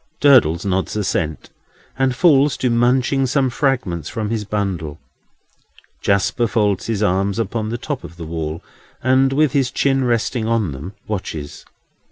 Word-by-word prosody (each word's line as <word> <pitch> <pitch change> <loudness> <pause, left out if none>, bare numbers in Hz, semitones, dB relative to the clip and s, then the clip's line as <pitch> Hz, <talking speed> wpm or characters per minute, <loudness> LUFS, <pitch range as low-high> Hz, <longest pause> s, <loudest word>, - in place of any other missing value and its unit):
Durdles 120 - +5
nods 95 +1 -1
assent, 90 -6 -2 0.4
and 130 -1 +1
falls 145 -3 +4
to 125 - 0
munching 125 +3 +2
some 130 -1 +1
fragments 120 - -1
from 110 -1 -3
his 110 -2 -2
bundle. 95 -8 -3 1.0
Jasper 100 +4 +1
folds 105 -4 0
his 110 -2 -1
arms 100 +1 +1
upon 110 0 -2
the 120 - -3
top 140 +2 -5
of 85 - -11
the 85 - -7
wall, 80 0 -4 0.4
and, 130 +1 +3
with 150 0 +2
his 135 -3 +1
chin 135 0 +1
resting 120 -1 0
on 115 -7 0
them, 75 +9 -8
watches. 85 -8 -5
110 Hz, 150 wpm, -19 LUFS, 95-130 Hz, 1.0 s, Durdles